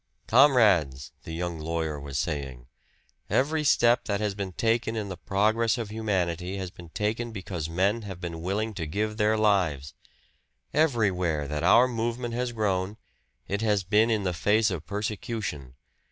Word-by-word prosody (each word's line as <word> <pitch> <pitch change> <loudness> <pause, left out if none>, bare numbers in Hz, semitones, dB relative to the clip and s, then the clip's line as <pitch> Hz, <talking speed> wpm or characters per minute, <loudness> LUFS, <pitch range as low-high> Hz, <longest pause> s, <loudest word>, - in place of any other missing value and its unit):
"Comrades," 110 - +4
the - - -7
young 85 0 -3
lawyer 80 -1 -2
was 70 -1 -5
saying, 65 -3 -3 0.6
"every 150 +3 +1
step 120 -4 +4
that 100 -1 -1
has 105 -2 -1
been 100 -1 -4
taken 115 +3 0
in 105 -3 -3
the 95 - -5
progress 110 +5 +1
of 115 -3 -5
humanity 95 -4 -1
has 95 -2 -5
been 90 -3 -13
taken 110 +6 -2
because 90 -6 -5
men 100 +7 +1
have 95 -4 -8
been 85 -2 -6
willing 105 +5 -2
to 85 -5 -4
give 105 +6 -2
their 110 0 +2
lives. 90 -10 +1 0.8
Everywhere 95 - +1
that 75 +1 -3
our 110 +8 +6
movement 120 0 -3
has 125 +1 -1
grown, 100 -2 -1 0.5
it 100 +2 -2
has 105 -3 +1
been 105 +5 +3
in 110 -3 +1
the 90 -2 -1
face 105 +4 +2
of 85 -4 -5
persecution. 105 - -4
100 Hz, 160 wpm, -27 LUFS, 85-110 Hz, 0.8 s, our